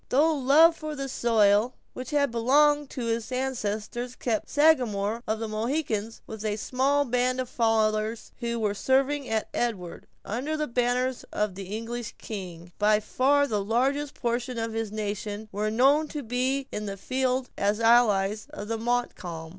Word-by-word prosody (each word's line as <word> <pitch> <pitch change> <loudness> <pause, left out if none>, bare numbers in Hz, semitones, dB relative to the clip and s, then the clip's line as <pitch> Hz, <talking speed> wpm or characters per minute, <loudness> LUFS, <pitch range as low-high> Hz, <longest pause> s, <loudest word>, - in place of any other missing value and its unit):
Though 305 +5 +4
love 300 +4 +5
for 310 -1 -6
the 275 -1 -4
soil 225 -2 +3 0.2
which 255 -1 -7
had 285 -3 +1
belonged 290 +5 +3
to 245 - -5
his 230 +1 -2
ancestors 245 -1 -3
kept 225 -4 -2
the - - -13
Sagamore 235 -8 +3
of 220 - 0
the 225 0 -4
Mohicans 225 -1 -2
with 220 -1 -8
a 210 -1 -1
small 270 +6 +1
band 250 +1 0
of 255 - -2
followers 220 -1 0
who 235 -1 -2
were 210 -2 0
serving 270 +5 +1
at 220 -1 0
Edward, 195 -8 -3 0.2
under 270 +9 -2
the 305 - 0
banners 250 0 0
of 210 -2 -1
the 195 +1 -7
English 235 +1 -6
king, 175 -5 -8
by 210 0 +4
far 275 +6 +2
the 210 -7 -1
largest 270 +7 0
portion 240 +1 -2
of 225 0 -2
his 225 -2 -3
nation 210 0 -4
were 210 +2 -1
known 275 +7 +3
to 295 -1 -6
be 255 +3 -1
in 210 0 -4
the 195 0 -5
field 255 +4 -1
as 205 +2 0
allies 220 -3 +3
of 205 - -7
Montcalm. 200 -9 -2
235 Hz, 165 wpm, -27 LUFS, 215-265 Hz, 0.2 s, love